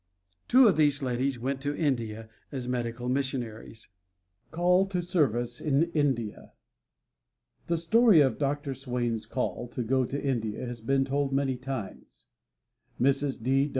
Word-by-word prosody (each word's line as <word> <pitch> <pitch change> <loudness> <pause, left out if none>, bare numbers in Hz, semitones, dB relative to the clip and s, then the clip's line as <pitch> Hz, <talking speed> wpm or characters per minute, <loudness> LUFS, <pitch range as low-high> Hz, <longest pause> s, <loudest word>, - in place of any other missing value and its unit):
Two 255 0 +7
of 185 -7 +3
these 145 -2 +3
ladies 130 +1 -1
went 135 +3 -3
to 145 +1 -2
India 115 -7 -1 0.2
as 130 -4 -5
medical 120 -1 -3
missionaries. 125 -4 -3 0.6
CALL 180 +4 +3
TO 185 -2 -2
SERVICE 120 - 0
IN 155 +3 +1
INDIA 130 -9 -1 1.1
The 170 - +1
story 215 +3 +5
of 135 -5 +3
Dr. 145 -1 -1
Swain's 120 -4 -3
call 125 -1 -3
to 120 +1 -4
go 130 +2 +1
to 140 +3 -4
India 120 -4 -2
has 120 -2 -7
been 135 +3 +1
told 140 0 -1
many 135 -1 +1
times. 130 -4 -7 0.7
Mrs. 135 -1 +1
135 Hz, 135 wpm, -28 LUFS, 120-145 Hz, 1.1 s, Two